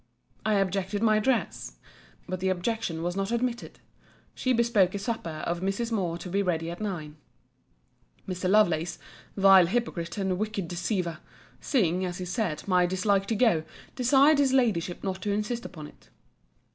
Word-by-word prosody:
I 215 -1 +2
objected 195 +1 0
my 215 -1 +4
dress. 240 +2 -1 0.5
But 185 - -3
the 190 +1 0
objection 185 -2 -2
was 175 +1 -2
not 195 +2 -2
admitted. 235 0 -2 0.6
She 255 - -1
bespoke 230 -6 +3
a - - 0
supper 195 -7 -4
of 170 0 -1
Mrs. 195 +5 -2
Moore 180 -6 -1
to 180 - -8
be 195 +3 0
ready 165 -3 -1
at 175 - -8
nine. 160 -8 -5 1.1
Mr. 185 0 -2
Lovelace, 175 -5 +3 0.4
vile 195 -2 +7
hypocrite, 175 -5 -2
and 190 -2 -1
wicked 210 -4 -2
deceiver! 175 -1 -2 0.4
seeing, 185 - +1
as 180 -1 -3
he 185 - -5
said, 180 -3 -3
my 180 -2 +3
dislike 195 +2 +1
to 225 - 0
go, 215 -8 +3 0.3
desired 275 +4 +4
his 270 -2 +3
Ladyship 205 -10 +1
not 190 -1 -3
to 205 - -3
insist 215 +4 -2
upon 155 -5 -8
it. - - -16
195 Hz, 160 wpm, -27 LUFS, 175-220 Hz, 1.1 s, vile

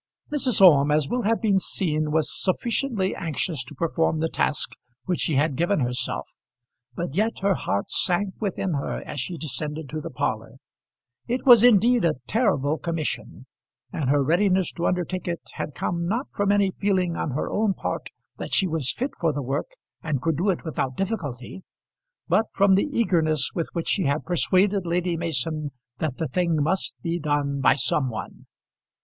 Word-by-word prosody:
Mrs. 255 -8 +2
Orme, 150 -6 +7
as 150 -1 +2
will 245 +9 -1
have 225 +1 +2
been 200 -3 +3
seen, 155 -5 -1
was 155 0 +1
sufficiently 215 0 0
anxious 160 -2 -2
to 150 - -11
perform 160 +1 0
the 160 +1 0
task 150 - 0 0.3
which 180 -2 -1
she 155 - +1
had 145 +1 +2
given 175 +3 +1
herself, 125 0 -1 0.7
but 170 -1 -4
yet 215 +5 0
her 200 0 +4
heart 100 - -2
sank 190 +2 +1
within 195 -3 -2
her 140 - -3
as 145 - -5
she 170 +7 -3
descended 150 +1 -3
to 155 +2 -4
the - - -6
parlour. 110 -3 -3 0.7
It 250 +2 -2
was 240 -4 +8
indeed 240 0 +5
a 165 -2 +2
terrible 160 - +1
commission, 165 -3 -3 0.5
and 140 -5 -1
her 145 0 +3
readiness 185 +4 +2
to 170 - -2
undertake 180 +1 -2
it 170 -2 -2
had 145 - -5
come 170 -1 -2
not 235 +8 -1
from 200 0 +1
any 200 -2 +3
feeling 185 -3 0
on - - -2
her 150 - -2
own 210 -2 +1
part - - -4 0.3
that - - -2
she 195 - +3
was 160 -6 -1
fit 260 +5 -3
for 165 -2 +2
the 145 -1 -4
work 135 - -2 0.3
and 150 -4 -1
could 165 +4 0
do 185 +5 +1
it 185 - -1
without 135 -5 -3
difficulty, 185 - -4 0.7
but 220 +1 +2
from 200 -1 +4
the 200 +10 +2
eagerness 160 - +2
with 165 - -2
which 170 - -2
she 190 - +2
had 145 +2 0
persuaded 190 +2 +2
Lady 175 0 -1
Mason 155 -2 -1 0.3
that 150 -5 -2
the 160 - -2
thing 170 +4 0
must 160 +6 0
be 170 0 -1
done 145 -2 -1
by 135 - +5
some 135 0 +1
one. 110 -5 -8
170 Hz, 180 wpm, -24 LUFS, 150-195 Hz, 0.7 s, was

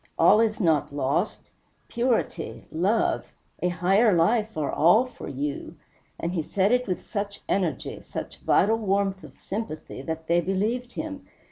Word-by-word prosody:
All 215 - +6
is 225 -2 +2
not 160 -9 +2
lost. 145 +8 -1 0.4
Purity, 235 -8 -1
love, 195 +8 +1 0.3
a 180 - +2
higher 190 +6 +3
life, 215 +5 +2
are 150 -2 -1
all 180 +10 +5
for 255 - -9
you," 140 +2 -4 0.4
and 170 - -2
he 170 - 0
said 195 +6 +1
it 250 -1 +2
with 185 - -3
such 200 -2 -4
energy, 180 -6 -1
such - - -7
vital 220 +4 +3
warmth 195 -2 0
of - - -13
sympathy, 190 -10 -5
that 160 +3 -5
they 170 +1 +3
believed 215 +8 -1
him. 290 -3 -6
195 Hz, 150 wpm, -26 LUFS, 165-220 Hz, 0.4 s, All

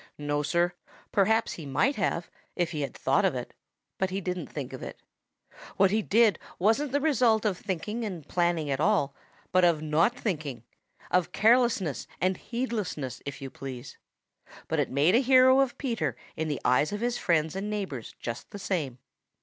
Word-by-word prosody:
No, 145 0 -1
Sir. 170 +4 +1 0.4
Perhaps 220 +3 +2
he 155 -4 -8
might 250 - +2
have, 180 -4 -1 0.2
if 175 -3 0
he 155 -3 -3
had 140 - -4
thought - - +2
of - - +2
it, - - -5 0.5
but 190 - +1
he 190 +1 -2
didn't 180 -3 -3
think 135 -3 -6
of 130 - -7
it. - - -7 0.8
What 195 -1 +5
he 220 +1 +2
did 220 +1 +3 0.2
wasn't 225 +9 +2
the 285 - +2
result 250 -8 +3
of 205 -3 +2
thinking 205 +5 -4
and 180 -9 -5
planning 170 -4 0
at 135 - -1
all, 155 -6 +2 0.4
but 185 0 +4
of 165 -3 +3
not 165 +10 +2
thinking; 155 - -3 0.5
of 180 -1 +2
carelessness 220 - +3
and 185 +1 +2
heedlessness, 220 - -3
if 140 0 -6
you 135 - -6
please. 130 -1 -8 0.7
But - - 0
it - - +1
made 145 +7 +3
a 235 - +6
hero 260 0 +6
of 270 -3 +1
Peter 245 -5 -1 0.2
in 160 - -2
the 145 -3 -2
eyes 125 +6 +3
of 205 +1 -4
his 245 0 0
friends 160 -1 +1
and 200 +2 -3
neighbors 190 - -4
just 115 0 -6
the 205 - -8
same. 175 -10 -2
180 Hz, 180 wpm, -28 LUFS, 150-220 Hz, 0.8 s, a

